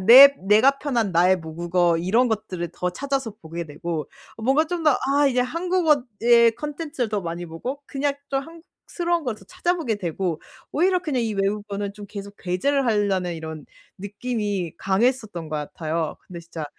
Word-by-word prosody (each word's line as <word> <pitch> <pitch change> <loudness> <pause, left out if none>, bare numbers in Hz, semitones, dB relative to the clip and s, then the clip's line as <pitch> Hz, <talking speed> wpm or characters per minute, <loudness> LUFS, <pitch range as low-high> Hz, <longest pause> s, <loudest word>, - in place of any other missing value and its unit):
그냥 185 - -6
내 275 +4 +11
내가 260 +7 +5
편한 235 -9 0
나의 180 +3 +4
모국어 170 +1 0
이런 225 +9 +2
것들을 190 -6 -3
더 180 0 -2
찾아서 270 +2 -2
보게 170 +1 -5
되고 160 +1 -5 0.3
어 225 - -10
뭔가 270 +6 +3
좀 345 +1 -3
더 295 -4 +5 0.2
아 290 - +5
이제 255 -2 +2
한국어의 250 - +3
콘텐츠를 295 -4 -3
더 210 -1 -1
많이 170 0 -5
보고 250 - -6
그냥 280 0 -1 0.2
좀 270 0 +1
한국스러운 335 +1 -4
걸 240 -4 -1
더 - - -16
찾아보게 350 - -1
되고 175 -3 -2 0.3
오히려 365 +3 +3
그냥 270 -7 -1
이 220 -2 -2
외국어는 200 0 -2
좀 205 0 -10
계속 200 0 -8
배제를 260 +10 0
하려는 195 -5 +1
이런 160 -2 -7 0.3
느낌이 205 -3 -3
강했었던 205 -4 0
것 155 - -3
같아요. 155 +2 -3
근데 175 - -8
진짜 165 -2 -7
210 Hz, 350 characters per minute, -23 LUFS, 180-275 Hz, 0.3 s, 내